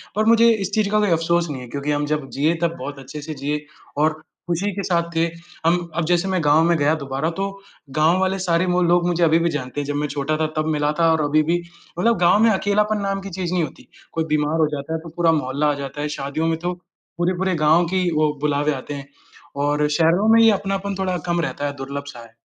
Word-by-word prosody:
पर 215 Hz, +1 st, +1 dB
मुझे 230 Hz, +1 st, +6 dB
इस 200 Hz, -3 st, -3 dB
चीज़ 215 Hz, -1 st, +1 dB
का 215 Hz, -, +3 dB
कोई 210 Hz, -1 st, +2 dB
अफ़सोस 170 Hz, +1 st, +1 dB
नहीं 135 Hz, -3 st, -5 dB
है, 125 Hz, -, -9 dB
क्योंकि 140 Hz, +4 st, -3 dB
हम 145 Hz, 0 st, 0 dB
जब 150 Hz, -2 st, -2 dB
जिए 155 Hz, +5 st, +1 dB
तब 170 Hz, -1 st, 0 dB
बहुत 145 Hz, 0 st, -6 dB
अच्छे 135 Hz, +3 st, -8 dB
से 155 Hz, +2 st, -6 dB
जिए 150 Hz, +1 st, -3 dB, 0.4 s
और 155 Hz, 0 st, +1 dB, 0.3 s
खुशी 175 Hz, +4 st, -1 dB
के 200 Hz, +1 st, -4 dB
साथ 170 Hz, -2 st, 0 dB
थे। 165 Hz, +1 st, +3 dB, 0.4 s
हम 170 Hz, +2 st, +4 dB, 0.2 s
अब 170 Hz, -1 st, 0 dB
जैसे 175 Hz, +2 st, +2 dB
मैं 190 Hz, -1 st, 0 dB
गाँव 150 Hz, +2 st, +4 dB
में 170 Hz, 0 st, +3 dB
गया 145 Hz, +1 st, +2 dB
दोबारा 140 Hz, +1 st, -2 dB
तो 195 Hz, -, 0 dB, 0.5 s
गाँव 160 Hz, +4 st, +4 dB
वाले 190 Hz, 0 st, +1 dB
सारे 175 Hz, -1 st, +1 dB
वो 180 Hz, 0 st, +1 dB
लोग 175 Hz, 0 st, +3 dB
मुझे 175 Hz, -1 st, +1 dB
अभी 165 Hz, 0 st, +4 dB
भी 170 Hz, 0 st, +1 dB
जानते 145 Hz, -2 st, -4 dB
हैं, -, -, -5 dB
जब 145 Hz, -, -2 dB
मैं 150 Hz, +1 st, -1 dB
छोटा 145 Hz, +2 st, -2 dB
था 155 Hz, 0 st, 0 dB
तब 155 Hz, -, +1 dB
मिला 150 Hz, 0 st, +1 dB
था 165 Hz, -1 st, +4 dB
और 160 Hz, -1 st, +2 dB
अभी 150 Hz, +1 st, +3 dB
भी 170 Hz, +3 st, +1 dB, 0.4 s
मतलब 230 Hz, +4 st, +3 dB
गाँव 175 Hz, +3 st, +4 dB
में 230 Hz, -, +6 dB
अकेलापन 210 Hz, +1 st, +1 dB
नाम 195 Hz, 0 st, -2 dB
की 195 Hz, -, -7 dB
चीज़ 180 Hz, -1 st, -3 dB
नहीं 180 Hz, -2 st, +1 dB
होती। -, -, -8 dB, 0.3 s
कोई 165 Hz, -, 0 dB
बीमार 150 Hz, +1 st, +1 dB
हो 155 Hz, -, +4 dB
जाता 140 Hz, +3 st, -5 dB
है 160 Hz, -, -1 dB
तो 165 Hz, +1 st, -10 dB
पूरा 170 Hz, -1 st, +3 dB
मोहल्ला 140 Hz, +3 st, -1 dB
आ -, -, 0 dB
जाता 140 Hz, +2 st, -6 dB
है, 150 Hz, -, -1 dB
शादियों 145 Hz, +2 st, -2 dB
में 165 Hz, 0 st, 0 dB
तो 175 Hz, +2 st, -2 dB, 0.4 s
पूरे-पूरे 180 Hz, +1 st, 0 dB
गाँव 165 Hz, +3 st, +5 dB
की, 180 Hz, 0 st, 0 dB
वो 155 Hz, -1 st, +1 dB
बुलावे 145 Hz, 0 st, +1 dB
आते 140 Hz, +2 st, -6 dB
हैं। 140 Hz, -1 st, -7 dB, 0.6 s
और 150 Hz, +1 st, +1 dB
शहरों 165 Hz, +6 st, +3 dB
में 230 Hz, -, +6 dB
ये 225 Hz, -1 st, +7 dB
अपनापन 195 Hz, 0 st, -2 dB
थोड़ा 185 Hz, -1 st, 0 dB
कम 170 Hz, 0 st, +1 dB
रहता 145 Hz, -3 st, -3 dB
है, 145 Hz, -, -2 dB
दुर्लभ 140 Hz, +1 st, -5 dB
सा 135 Hz, -4 st, -9 dB
है। 115 Hz, -1 st, -14 dB
165 Hz, 250 wpm, -21 LUFS, 150-180 Hz, 0.6 s, ये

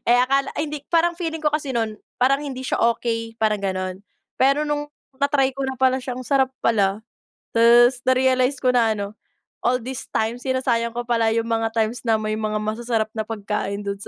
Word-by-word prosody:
eh, 245 Hz, -, +6 dB
akala 275 Hz, +2 st, +1 dB
ay 305 Hz, -, -1 dB
hindi 295 Hz, -2 st, -5 dB
parang 340 Hz, 0 st, +3 dB
feeling 325 Hz, -3 st, -3 dB
ko 300 Hz, -, +3 dB
kasi 295 Hz, -3 st, -2 dB
no'n 220 Hz, -2 st, -1 dB, 0.2 s
parang 275 Hz, +3 st, +3 dB
hindi 260 Hz, -2 st, -5 dB
siya -, -, -1 dB
okey 230 Hz, -1 st, -4 dB
parang 210 Hz, -2 st, +1 dB
gano'n. 185 Hz, -1 st, -3 dB, 0.4 s
Pero 275 Hz, +3 st, +3 dB
nung 295 Hz, 0 st, -2 dB, 0.3 s
na-try 280 Hz, -2 st, +2 dB
ko 275 Hz, -, -4 dB
na 265 Hz, -1 st, -4 dB
pala 260 Hz, 0 st, +3 dB
siyang 250 Hz, 0 st, -5 dB
sarap 270 Hz, -2 st, +2 dB
pala. 200 Hz, -2 st, +2 dB, 0.6 s
Ta's 240 Hz, +2 st, +6 dB
na-realize 260 Hz, +1 st, +3 dB
ko 255 Hz, -, +4 dB
na 230 Hz, -3 st, +3 dB
ano, 200 Hz, -1 st, -4 dB, 0.5 s
all 250 Hz, 0 st, +2 dB
this 260 Hz, 0 st, -6 dB
time 225 Hz, +2 st, 0 dB
sinasayang 250 Hz, -3 st, 0 dB
ko 240 Hz, -, -2 dB
pala 230 Hz, -2 st, +2 dB
yung 230 Hz, 0 st, 0 dB
mga 225 Hz, 0 st, 0 dB
times 225 Hz, +1 st, 0 dB
na 225 Hz, -, +4 dB
may 215 Hz, 0 st, -2 dB
mga 215 Hz, -1 st, -2 dB
masasarap 220 Hz, +1 st, -1 dB
na 220 Hz, -1 st, -4 dB
pagkain 205 Hz, -2 st, -3 dB
dun 200 Hz, 0 st, -3 dB
sa -, -, -8 dB
240 Hz, 195 wpm, -22 LUFS, 220-265 Hz, 0.6 s, eh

